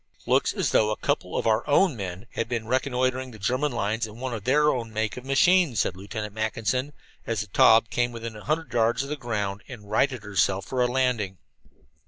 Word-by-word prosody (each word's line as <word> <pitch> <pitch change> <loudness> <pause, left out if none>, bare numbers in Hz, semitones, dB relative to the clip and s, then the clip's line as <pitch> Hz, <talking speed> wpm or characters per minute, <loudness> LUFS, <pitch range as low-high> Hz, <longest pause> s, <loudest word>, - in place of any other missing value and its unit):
"Looks - - +2
as - - -1
though 105 - +3
a 110 - -1
couple - - -1
of - - -1
our 110 +1 +2 0.2
men 100 - -6
had 115 - -3
been 115 -2 -2
reconnoitering 130 +1 0
the 115 - -12
German 130 +8 0
lines 110 0 -1
in 110 +2 -12
one 130 -1 -3
of 105 -3 -6
their 150 +3 +4
own 115 -3 -4
make 110 -1 -2
of 125 - -8
machines," 140 - +3
said 90 - -1
Lieutenant 105 +2 -6
Mackinson, 110 +5 -1 0.3
as 115 -4 -1
the 105 - -6
Taube 115 +4 +5
came 120 0 0
within 115 -1 -7
a 105 - -10
hundred 155 -2 -2
yards 120 +2 +2
of 140 - -7
the 150 - -2
ground 105 -6 -3
and 105 -5 -11
righted 130 0 +1
herself 100 -1 0
for 130 -1 -2
a 125 - +4
landing. 120 -7 0
115 Hz, 210 wpm, -26 LUFS, 105-130 Hz, 0.3 s, Taube